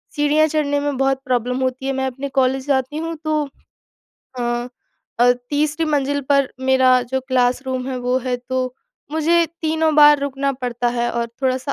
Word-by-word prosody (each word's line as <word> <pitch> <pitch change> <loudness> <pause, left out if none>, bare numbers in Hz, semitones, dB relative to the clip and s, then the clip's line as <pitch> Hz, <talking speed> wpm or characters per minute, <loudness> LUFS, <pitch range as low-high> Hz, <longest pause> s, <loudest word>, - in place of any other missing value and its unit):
सीढ़ियाँ 300 +1 +3
चढ़ने 290 -2 0
में 285 -2 -2
बहुत 270 0 +1
प्रॉब्लम 250 0 0
होती 260 +1 -2
है, 270 - 0
मैं 265 0 -1
अपने 265 +2 -5
कॉलेज 265 +1 0
जाती 270 +2 0
हूँ 330 +1 -3
तो 310 -1 0 1.0
हाँ, 240 0 -2 0.5
अ, 245 +1 +6 0.2
तीसरी 305 +2 0
मंजिल 285 -1 0
पर 275 -2 +3
मेरा 260 -1 +4
जो 265 +2 -2
क्लासरूम 255 0 0
है 260 - -3
वो 250 +1 0
है 250 -1 0
तो 255 0 -3 0.4
मुझे 335 +2 +3 0.2
तीनों 315 0 +1
बार 295 -1 +8
रुकना 280 0 -1
पड़ता 245 -2 -2
है 240 0 0
और 235 0 -1 0.2
थोड़ा-सा 260 +2 0
265 Hz, 170 wpm, -20 LUFS, 255-295 Hz, 1.0 s, बार